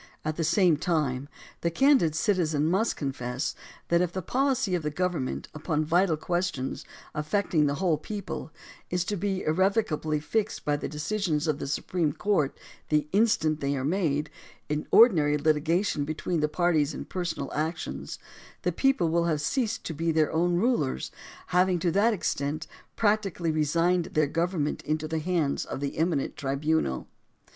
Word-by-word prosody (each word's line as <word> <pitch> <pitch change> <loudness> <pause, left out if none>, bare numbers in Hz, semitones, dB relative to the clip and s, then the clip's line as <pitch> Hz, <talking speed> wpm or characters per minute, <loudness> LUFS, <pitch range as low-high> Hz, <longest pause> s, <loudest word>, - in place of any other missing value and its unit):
At 155 0 -1
the 165 - -1
same 170 0 +4
time, 145 -5 -1 0.3
the 170 - +1
candid 205 - +4
citizen 160 -5 +1
must 190 +8 +1
confess 130 -1 -3 0.4
that 170 0 +4
if 180 -2 0
the 185 0 -4
policy 265 -3 +1
of 175 - +1
the 150 - -1
government, 165 -4 -2
upon 155 0 -1
vital 170 +1 +3
questions 175 -5 -2 0.3
affecting 155 0 +1
the 140 - 0
whole 170 -3 +1
people, 200 -3 -6 0.4
is 180 -1 0
to 205 - -1
be 195 0 -2
irrevocably 160 -3 +1
fixed 215 +7 -2
by 145 0 +2
the 145 - -4
de 150 - -8
cisions 160 -2 -1
of 150 -2 0
the - - -4
Supreme 155 +2 -1
Court, 175 -9 0 0.3
the 150 -1 +2
instant 195 -8 +2
they 140 0 0
are 130 - -2
made, 150 -3 0 0.4
in 150 0 -2
ordinary 155 -11 +6
litigation 155 +2 +1
between 155 +3 -2
the 150 0 +1
parties 160 -3 +1
in - - -6
personal 175 -6 -4
actions, 160 +3 -3 0.5
the - - +1
people 270 -11 +2
will 170 +1 +2
have 155 -3 +1
ceased 225 - -1
to 165 - -4
be 165 +2 0
their 155 -1 +2
own 175 +2 +2
rulers, 175 - 0 0.4
having 180 0 +3
to 170 0 0
that 205 +6 +3
extent 155 -6 -2 0.3
practically 205 -6 +1
resigned 165 +3 +2
their 155 -3 +1
government 165 0 -1
into 155 0 -2
the 160 0 -1
hands 160 -3 0
of - - -5
the 140 0 -3
eminent 160 -4 0
tribunal. 140 - -1
160 Hz, 165 wpm, -27 LUFS, 150-185 Hz, 0.5 s, ordinary